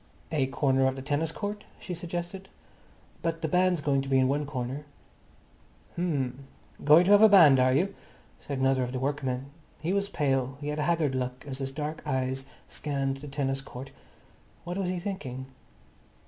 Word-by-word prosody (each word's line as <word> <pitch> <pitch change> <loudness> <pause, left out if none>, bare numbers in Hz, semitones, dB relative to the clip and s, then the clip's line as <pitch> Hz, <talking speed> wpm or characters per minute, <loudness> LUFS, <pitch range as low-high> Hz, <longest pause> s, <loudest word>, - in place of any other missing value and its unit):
"A 145 -4 +1
corner 135 0 +2
of 130 - 0
the 135 - -7
tennis 150 +3 0
court," 205 +3 -4 0.2
she 180 - -6
suggested. 175 +2 -5 0.7
"But 165 0 -2
the - - +2
band's 180 0 +2
going 140 -1 +2
to 135 - -6
be 135 - +4
in 130 0 +4
one 145 +2 0
corner." 130 +1 -4 1.1
"H'm, 140 -6 -2 0.4
going 150 +4 +7
to 190 - +2
have 205 0 +8
a 220 - +9
band, 160 -10 +8
are 130 0 +4
you?" 180 +9 +2 0.5
said 140 - -5
another 135 0 +2
of 125 0 -2
the 130 - -2
workmen. 135 -1 -2 0.3
He 170 +4 -1
was 200 0 0
pale. 135 -4 0
He 145 0 -4
had 150 +1 -2
a 150 - +1
haggard 160 -5 +2
look 125 -1 -3
as 135 -1 -5
his 135 -1 -3
dark 150 +2 -4
eyes 130 -1 -2 0.2
scanned 135 -2 -2
the 145 +2 -9
tennis 135 -1 -2
court. 135 0 -9 0.7
What 175 +3 -4
was 185 -2 -1
he 180 - -1
thinking? 145 -9 -5
145 Hz, 185 wpm, -28 LUFS, 135-170 Hz, 1.1 s, a